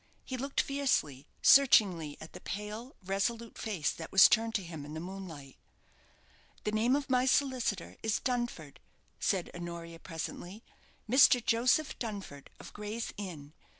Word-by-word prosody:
He 260 - -4
looked 275 +2 0
fiercely, 210 - -1 0.2
searchingly, 185 - +5
at 160 - -11
the - - -9
pale, 210 +5 -6
resolute 225 +4 -2
face 195 -9 -1
that 165 - -8
was 195 -1 +9
turned 225 +1 +1
to 200 - 0
him 165 -4 -8
in 150 +2 -8
the - - -4
moonlight. 170 -7 -8 1.1
"The 210 - -1
name 225 +5 +2
of 285 -1 -2
my 255 0 +2
solicitor 255 -8 0
is 220 -1 0
Dunford," 240 - -3 0.4
said 190 -4 0
Honoria, 170 -1 -7
presently; 175 +5 -7 0.4
"Mr. 250 +1 +6
Joseph 250 +6 +2
Dunford, 200 - -6
of - - -11
Gray's 210 +2 -5
Inn. 160 -8 -8
205 Hz, 145 wpm, -31 LUFS, 165-240 Hz, 1.1 s, was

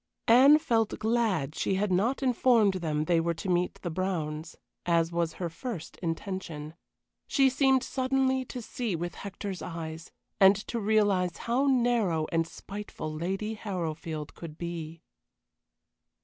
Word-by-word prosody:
Anne 265 +6 +8
felt 230 -8 0
glad 215 - 0
she 190 - 0
had 200 +1 0
not 225 +10 +1
informed 240 -5 +4
them 155 -5 -1
they 170 0 +3
were 170 0 0
to 165 - -6
meet 180 0 +1
the 175 - -2
Browns, 160 -3 -3 0.3
as 170 -1 +2
was 170 -1 0
her 175 - -3
first 170 +1 -6
intention. 165 -3 -4 0.5
She 270 -2 +4
seemed 265 -1 +3
suddenly 260 0 +1
to 245 -1 -7
see 225 -4 -3
with 175 +1 -4
Hector's 200 -1 -6
eyes, 165 -1 -6 0.3
and 195 +1 +8
to 235 - -1
realize 205 -5 +2
how 250 +4 +2
narrow 235 - +2
and 165 0 +1
spiteful 200 -5 -7
Lady 195 +7 -2
Harrowfield 165 -7 -4
could 160 -2 -9
be. 165 -1 -6
185 Hz, 140 wpm, -29 LUFS, 165-230 Hz, 0.5 s, Anne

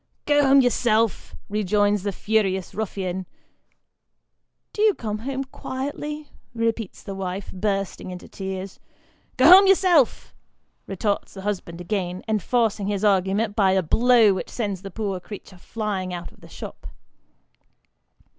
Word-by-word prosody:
" - - -51
Go 290 0 +4
home 275 0 +7
yourself," 230 -3 +1
rejoins 205 0 +1
the 200 +1 -2
furious 195 -2 0
ruffian. 190 -3 -3 0.7
" - - -54
Do 425 -2 +3
come 215 -2 -4
home 270 +3 -3
quietly," 290 +3 -6 0.2
repeats 230 -3 -2
the 195 - -6
wife, 190 0 -5
bursting 195 -1 -2
into 180 0 -8
tears. 190 0 -6 0.3
" - - -37
Go 255 - +4
home 385 +2 +10
yourself," 360 - +3 0.5
retorts 200 +2 -2
the 195 - -7
husband 185 -4 -4
again, 180 -1 -3
enforcing 220 -1 0
his 205 0 -1
argument 200 +2 +2
by 195 -3 +3
a 190 -1 +2
blow 230 +4 +5
which 185 - -4
sends 200 -6 -3
the 195 - -7
poor 195 -1 -3
creature 190 0 -11
flying 195 -4 -3
out 175 0 -7
of - - -22
the - - -14
shop. - - -9
205 Hz, 140 wpm, -24 LUFS, 190-230 Hz, 0.7 s, home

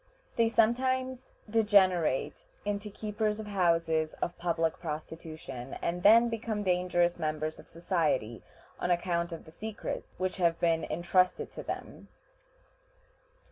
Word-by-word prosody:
They 230 -1 +3
sometimes 255 +3 +1 0.2
degenerate 190 - +3 0.2
into 205 0 -2
keepers 210 +1 -2
of 215 - -5
houses 165 -5 +1
of 175 - -3
public 165 -2 0
prostitution, 155 -5 -6
and 175 +1 -2
then 230 +5 +7
become 225 -2 -2
dangerous 180 -2 +1
members 155 0 -2
of - - -14
society, 155 - -1 0.4
on - - -1
account 170 -1 0
of 165 - -7
the 160 - -13
secrets 215 +5 -6
which 185 +1 -2
have 170 -2 +2
been 165 -1 +2
intrusted 180 +2 +1
to - - -7
them. - - -7
175 Hz, 125 wpm, -30 LUFS, 165-210 Hz, 0.4 s, then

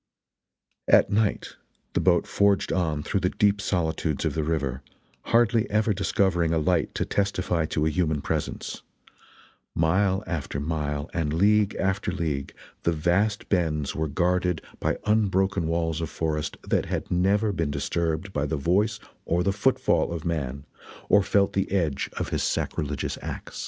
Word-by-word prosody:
At - - +5
night 105 0 0 0.4
the - - +1
boat - - +3
forged 100 -1 +2
on 80 -5 0
through 100 - 0
the 90 -1 +1
deep 100 +1 +2
solitudes 80 -5 -1
of - - 0
the 80 - -1
river, 70 -5 -1 0.4
hardly 115 -1 +3
ever 105 0 +2
discovering 95 -3 +1
a 85 - +2
light 80 +1 +1
to - - 0
testify 95 -5 0
to 75 0 0
a - - +3
human 80 -4 0
presence - - -3 0.9
mile 95 +5 +2
after 75 -5 -3
mile 75 -1 -2
and 80 -5 -1
league 105 +4 +3
after 95 +1 0
league 80 -7 -2 0.3
the 85 - +1
vast 90 +7 +1
bends 80 -6 0
were 80 0 -1
guarded 90 +2 0 0.2
by - - 0
unbroken 95 -4 +2
walls 80 -1 -1
of 80 - -3
forest 75 -2 -2
that - - +1
had - - -3
never 100 +4 +2
been 80 -6 -1
disturbed 80 +5 -2
by 75 0 0
the 80 - -1
voice 100 +9 +1 0.3
or 85 +1 +1
the 100 +1 +1
foot 125 +6 +2
fall - - +1
of 85 -2 -5
man 70 -4 -3 0.4
or 105 - +6
felt 100 +1 +2
the 95 -1 -1
edge 80 -8 0
of - - -2
his - - -1
sacrilegious 70 -1 -2
axe. - - -7
85 Hz, 160 wpm, -26 LUFS, 80-100 Hz, 0.9 s, or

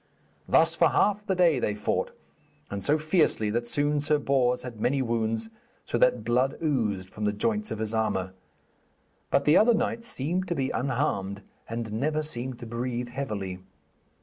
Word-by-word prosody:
Thus - - +4
for - - +4
half 210 +1 +1
the 190 - +1
day 170 -6 +4
they 105 -3 -1
fought, 105 - -1 0.6
and 100 -1 -4
so 150 +9 +3
fiercely 155 - +2
that 120 +2 -1
soon 145 +3 +1
Sir 150 +1 +2
Bors 130 -3 +1
had 120 -4 -8
many 135 +4 +1
wounds, 115 -1 -1 0.3
so 120 - -1
that 125 -2 +3
blood 125 +4 +1
oozed 110 - -1
from 105 - -4
the 105 - +2
joints 215 - -1
of - - -4
his 110 0 -1
armour. 95 -4 -1 1.0
But 140 - +2
the 150 - +6
other 230 +2 +5
knight 230 +1 -1
seemed 180 - -2
to 175 - -1
be 135 -3 -1
unharmed, 110 -7 -1 0.3
and 115 -1 -4
never 150 +7 0
seemed 130 -4 -3
to 120 - -9
breathe 120 +1 -3
heavily. 105 -8 -4
125 Hz, 175 wpm, -27 LUFS, 110-150 Hz, 1.0 s, the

